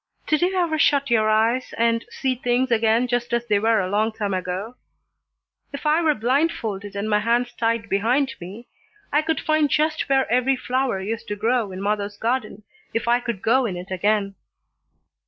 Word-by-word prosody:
Did 305 +1 +1
you 365 +2 +1
ever 335 -4 0
shut 280 -3 +2
your 215 -2 +3
eyes 225 +4 +1
and 230 0 +1
see 265 -1 -1
things 245 0 0
again 230 +2 +3
just 245 -1 -2
as 235 0 0
they 210 -3 +2
were 225 +1 +2
a 185 - -1
long 210 +3 +1
time 210 -3 -3
ago? 185 +5 -3 1.0
If 280 +2 -8
I 305 +2 +3
were 310 -3 +2
blind 270 +9 +2
folded 205 - -6
and 200 +1 -2
my 210 -1 +2
hands 240 +3 0
tied 230 -1 -1
behind 250 +7 +1
me 200 +7 -9 0.5
I 295 - +4
could 320 0 -1
find 310 -1 +1
just 310 +1 0
where 270 -1 +3
every 255 +2 +3
flower 255 -4 -1
used 225 +4 -4
to 205 - -3
grow 225 0 0
in 185 +1 -6
mother's 205 0 -2
garden, 225 -3 -2 0.3
if 230 - -1
I 240 +1 +4
could 235 -5 -5
go 250 +2 +3
in 185 -4 -4
it 180 +2 -9
again." 200 +1 0
230 Hz, 190 wpm, -23 LUFS, 210-260 Hz, 1.0 s, I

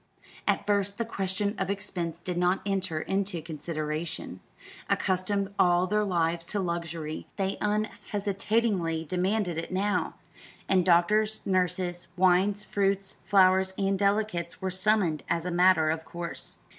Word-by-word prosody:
At - - +1
first 200 -1 0
the 230 - -1
question 200 -1 -1
of - - -1
expense 180 -5 -3
did 180 +1 -4
not 180 +2 +1
enter 190 -5 -1
into 190 -1 -1
consideration. 155 0 -4 0.5
Accustomed 195 +1 0
all 175 0 +4
their 210 +3 +1
lives 170 -3 0
to 205 - -1
luxury, 170 -3 -4
they 195 0 -2
unhesitatingly 205 -4 -1
demanded 180 +1 0
it 165 - -6
now; 200 +2 0 0.5
and 185 -2 +3
doctors, 210 +5 +3
nurses, 180 -1 0
wines, 190 +3 +3
fruits, 195 -1 0
flowers, 190 -1 +4
and 195 -1 0
delicacies 200 -4 0
were 190 0 -2
summoned 185 -5 +3
as 170 0 0
a 180 - -2
matter 175 -3 +4
of 160 0 -3
course. 170 +1 -4
185 Hz, 130 wpm, -28 LUFS, 170-200 Hz, 0.5 s, all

